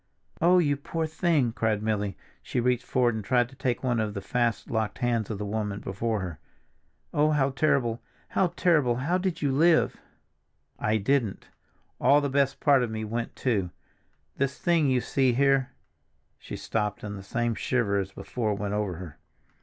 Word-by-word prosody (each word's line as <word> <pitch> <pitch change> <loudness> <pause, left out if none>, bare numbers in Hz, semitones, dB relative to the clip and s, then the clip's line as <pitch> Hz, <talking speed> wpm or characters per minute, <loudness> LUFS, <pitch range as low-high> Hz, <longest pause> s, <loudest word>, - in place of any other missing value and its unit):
"Oh, 175 +2 +5
you 145 -5 +2
poor 160 +3 -3
thing!" 155 -6 +1
cried 110 -2 0
Milly. 105 -3 -1 0.2
She - - -2
reached 125 0 +1
forward 125 -2 +2
and 110 -1 -4
tried 120 +1 +2
to 135 - -16
take 125 -1 -2
one 120 -2 +1
of 110 -1 -2
the - - -2
fast 120 0 -1
locked 110 -2 -1
hands 120 -4 0
of 110 - -3
the 105 - -4
woman 105 -1 -2
before 105 +2 -2
her. 90 -4 -6 0.7
"Oh, 150 +1 +3
how 140 -3 +2
terrible, 130 -5 +1 0.3
how 190 - +2
terrible! 150 -9 +3
How 155 +9 0
did 180 -4 -2
you 140 - +2
live?" 160 +4 +3 0.8
"I 110 +1 +1
didn't; 110 -1 0 0.5
all 140 +3 +5
the 145 -1 -1
best 140 0 +1
part 140 -3 +4
of 120 - -1
me 110 0 -4
went 115 +2 -4
too, 105 -8 0 0.7
this 140 0 -1
thing 170 -4 +2
you 130 -2 +2
see 130 -1 +1
here—" 135 0 +3 0.7
she - - -7
stopped, 105 -2 -2
and 105 -1 -5
the 100 - -7
same 120 +3 -1
shiver 105 -2 0
as 95 0 -3
before 110 0 -3
went 100 0 -3
over 105 -4 -1
her. 80 -4 -9
120 Hz, 180 wpm, -27 LUFS, 105-140 Hz, 0.8 s, Oh